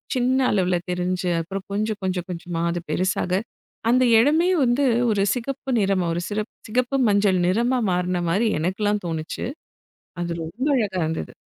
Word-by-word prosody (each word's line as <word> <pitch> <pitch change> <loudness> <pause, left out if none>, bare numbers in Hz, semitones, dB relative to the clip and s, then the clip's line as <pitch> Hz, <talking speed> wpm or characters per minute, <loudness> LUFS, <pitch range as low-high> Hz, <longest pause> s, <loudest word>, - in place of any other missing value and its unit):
சின்ன 255 +1 +2
அளவுல 185 -3 +2
தெரிஞ்சு, 180 0 -1
அப்புறம் 190 +3 -6
கொஞ்சம், 215 +1 -1
கொஞ்சம், 180 -2 -2
கொஞ்சமா 170 -1 -4
அது 175 0 -3
பெருசாக, 185 0 0 0.5
அந்த 255 +1 +4 0.2
இடமே 315 +9 +3
வந்து 255 +3 +2 0.3
ஒரு 200 -2 +2
சிகப்பு 265 +2 -4
நிறமா, 195 -3 +1
ஒரு 175 - -2
சிறப் 230 +4 -2
மஞ்சள் 200 -2 +3
நிறமா 240 +6 +2
மாறுன 180 0 0
மாரி 210 +7 +2
எனக்கல்லாம் 205 +4 0
தோணுச்சு. 160 -1 -4 0.8
அது 175 0 -2
ரொம்ப 220 - -4
அழகா 200 -6 0
இருந்தது. 160 - -3
195 Hz, 140 wpm, -23 LUFS, 180-235 Hz, 0.8 s, அந்த